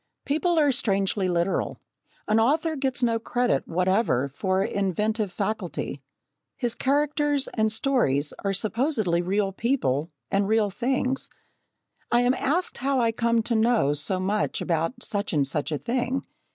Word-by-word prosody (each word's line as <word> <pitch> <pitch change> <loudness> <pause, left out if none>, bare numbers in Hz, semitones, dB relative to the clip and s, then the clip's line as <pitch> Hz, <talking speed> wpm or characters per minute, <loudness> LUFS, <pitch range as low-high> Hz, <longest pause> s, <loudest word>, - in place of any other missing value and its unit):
People 325 +4 +1
are 295 -3 +4
strangely 195 -6 +1
literal. 175 +2 0 0.5
An 215 +1 +3
author 310 +7 +2
gets 265 -3 -1
no 230 -1 +2
credit 245 - 0
whatever 185 - +1
for 185 +7 0
inventive 210 +1 -1
faculty 195 -8 -3 0.6
his 240 -2 0
characters 290 +1 +1
and 220 -1 +1
stories 215 - +1
are 200 - +1
supposedly 215 - 0
real 195 +2 0
people 180 - 0 0.2
and 195 0 +2
real 215 -1 +2
things. 260 +4 -1 0.8
I 240 - +4
am 245 +1 +3
asked 340 +8 -1
how 270 0 +1
I 230 -2 +2
came 230 0 +1
to 235 - -2
know 220 - +3
so 150 +6 -1
much 200 +3 -1
about 165 - -1
such 205 -3 -2
and 145 -3 +2
such 145 +3 -2
a 150 - 0
thing. 250 - -2
220 Hz, 145 wpm, -25 LUFS, 185-255 Hz, 0.8 s, are